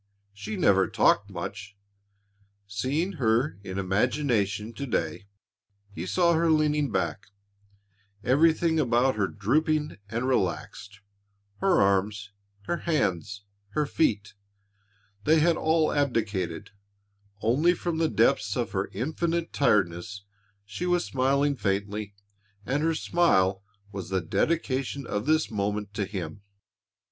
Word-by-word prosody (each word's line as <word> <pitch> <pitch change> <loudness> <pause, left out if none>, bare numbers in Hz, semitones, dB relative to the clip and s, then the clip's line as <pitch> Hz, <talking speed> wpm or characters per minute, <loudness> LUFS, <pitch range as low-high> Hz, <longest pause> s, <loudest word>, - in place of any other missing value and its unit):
She 205 - -6
never 100 - +4
talked - - +2
much. 100 0 -7 0.9
Seeing 130 - -1
her 115 +1 +1
in 95 -1 -6
imagination 105 +1 0
to 140 +3 -5
day, 85 -3 -2 0.7
he 85 +1 -5
saw 170 - +3
her 165 0 +2
leaning 150 -2 +2
back, 100 - -2 1.0
everything 160 +4 +3
about 125 -1 +2
her 100 -2 +1
drooping 150 - 0
and 120 +4 -2
relaxed, 105 -2 -2 0.6
her 195 -2 +3
arms, 100 +1 +1 0.3
her 175 - -2
hands, 100 - -1 0.3
her 150 -1 +2
feet 105 -10 0 0.9
they 155 +1 +5
had 165 +2 +3
all 160 0 +2
abdicated 110 - -1 0.7
only 150 +11 +3
from 170 -1 -3
the 160 -1 +2
depths 105 -2 +2
of 120 -2 -2
her 95 -1 -1
infinite 165 - -2
tiredness 100 -5 +1 0.4
she 140 - -4
was 175 -1 +1
smiling 140 +2 +1
faintly 100 -1 -2 0.5
and 135 +5 0
her 165 +1 +1
smile 100 - +2 0.3
was 95 -3 -6
the 95 0 +1
dedication 135 - -1
of 105 +2 -3
this 155 -3 +2
moment 105 0 -2
to 105 -1 -1
him. 100 0 -6
115 Hz, 120 wpm, -27 LUFS, 100-155 Hz, 1.0 s, they